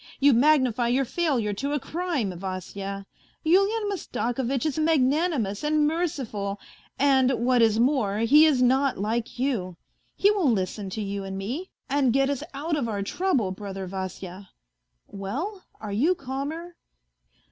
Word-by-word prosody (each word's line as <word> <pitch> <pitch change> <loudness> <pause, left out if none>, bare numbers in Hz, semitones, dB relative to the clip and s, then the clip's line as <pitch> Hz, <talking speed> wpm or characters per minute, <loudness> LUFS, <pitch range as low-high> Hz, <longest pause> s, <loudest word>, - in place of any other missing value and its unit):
You|magnify 260 -3 +4
your 260 +3 +2
failure 255 -9 0
to 280 +8 -3
a 295 - +1
crime, 285 - -2
Vasya. 195 +2 -5 0.4
Yulian 395 +6 +3
Mastakovitch 265 - -2
is 310 0 -1
a - - +2
magnanimous 290 - +1
and 300 0 +2
merciful, 260 - -2 0.4
and, 265 -2 +4 0.2
what 250 -1 +4
is 225 -1 +4
more, 235 -6 +2
he 285 +8 +6
is 265 -5 +3
not 265 +2 +2
like 225 +5 -2
you. 220 -10 -1 0.4
He 405 - +4
will 385 -9 +2
listen 195 -2 -1
to 215 +3 -4
you 200 0 -4
and 195 0 -5
me, 255 - -4 0.2
and 275 -2 +2
get 275 +2 +2
us 280 - -3
out 310 +4 -1
of 260 -6 -1
our 200 -2 -2
trouble, 260 - 0
brother 195 0 -6
Vasya. 190 0 -6 0.6
Well, 280 - -5
are 210 -2 -6
you 305 - +2
calmer 295 +5 -5
255 Hz, 145 wpm, -26 LUFS, 200-300 Hz, 0.6 s, he